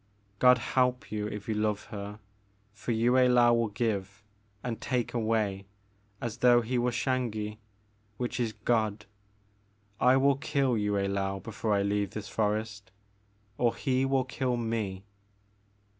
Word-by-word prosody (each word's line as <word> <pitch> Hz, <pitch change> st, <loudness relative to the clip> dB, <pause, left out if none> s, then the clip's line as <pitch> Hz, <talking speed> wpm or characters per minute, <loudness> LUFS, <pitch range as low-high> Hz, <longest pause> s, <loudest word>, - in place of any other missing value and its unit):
God 125 Hz, 0 st, +7 dB
help 125 Hz, +1 st, 0 dB
you 105 Hz, -1 st, -2 dB
if 105 Hz, -1 st, -7 dB
you 110 Hz, -, 0 dB
love 105 Hz, -1 st, 0 dB
her 105 Hz, 0 st, -6 dB, 0.6 s
for 105 Hz, +4 st, -4 dB
Yue 115 Hz, +2 st, +2 dB
Laou 125 Hz, -2 st, +5 dB
will 115 Hz, -1 st, +1 dB
give, 105 Hz, -1 st, -3 dB, 0.2 s
— 105 Hz, -1 st, -38 dB
and 115 Hz, -3 st, -4 dB
take 125 Hz, -2 st, -1 dB
away, 110 Hz, -4 st, 0 dB, 0.5 s
as 115 Hz, -1 st, -4 dB
though 120 Hz, -1 st, +5 dB
he 120 Hz, +2 st, -1 dB
were 120 Hz, +1 st, +2 dB
Xangi, 115 Hz, -4 st, -2 dB, 0.6 s
which 125 Hz, 0 st, -3 dB
is 115 Hz, -2 st, 0 dB
God. 110 Hz, -3 st, 0 dB, 0.9 s
I 125 Hz, +1 st, +5 dB
will 135 Hz, 0 st, +3 dB
kill 140 Hz, -3 st, +1 dB
Yue 105 Hz, -1 st, 0 dB
I^ou 100 Hz, -1 st, -1 dB
before 110 Hz, -1 st, -1 dB
I 100 Hz, -, +2 dB
leave 100 Hz, -1 st, -1 dB
this 105 Hz, -2 st, -5 dB
forest, 110 Hz, 0 st, -2 dB, 0.4 s
— 105 Hz, +1 st, -38 dB
or 120 Hz, -1 st, +2 dB
he 130 Hz, -2 st, 0 dB
will 135 Hz, -1 st, +1 dB
kill 130 Hz, -1 st, -1 dB
me. 110 Hz, -5 st, -2 dB
110 Hz, 150 wpm, -29 LUFS, 105-125 Hz, 0.9 s, God